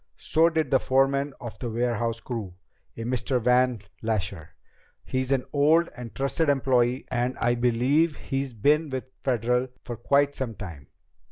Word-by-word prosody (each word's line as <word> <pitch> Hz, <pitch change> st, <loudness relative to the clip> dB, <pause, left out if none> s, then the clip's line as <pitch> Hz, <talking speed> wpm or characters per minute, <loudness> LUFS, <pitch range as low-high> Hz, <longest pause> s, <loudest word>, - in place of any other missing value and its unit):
So 165 Hz, +2 st, +3 dB
did 160 Hz, -4 st, -1 dB
the 135 Hz, -, +5 dB
foreman 135 Hz, +2 st, +1 dB
of 120 Hz, -2 st, -8 dB
the 120 Hz, -, -3 dB
warehouse 115 Hz, 0 st, -1 dB
crew 110 Hz, -8 st, -5 dB, 0.4 s
a 115 Hz, -, -4 dB
Mr. 125 Hz, +2 st, 0 dB
Van 125 Hz, -1 st, +3 dB, 0.2 s
Lasher. 100 Hz, -7 st, -3 dB, 0.5 s
He's 130 Hz, 0 st, -2 dB
an 135 Hz, -2 st, +1 dB
old 155 Hz, +4 st, +4 dB
and 115 Hz, -5 st, -9 dB
trusted 140 Hz, +5 st, 0 dB
employee 130 Hz, -2 st, +2 dB
and 125 Hz, 0 st, -1 dB
I 120 Hz, +1 st, +2 dB
believe 125 Hz, +6 st, +2 dB
he's 135 Hz, -2 st, -3 dB
been 150 Hz, +8 st, +2 dB
with 130 Hz, -1 st, -4 dB, 0.2 s
Federal 125 Hz, 0 st, +1 dB, 0.2 s
for 120 Hz, -, -5 dB
quite 140 Hz, +4 st, +2 dB
some 125 Hz, -6 st, -4 dB
time. 80 Hz, -10 st, -9 dB
125 Hz, 155 wpm, -26 LUFS, 115-140 Hz, 0.5 s, the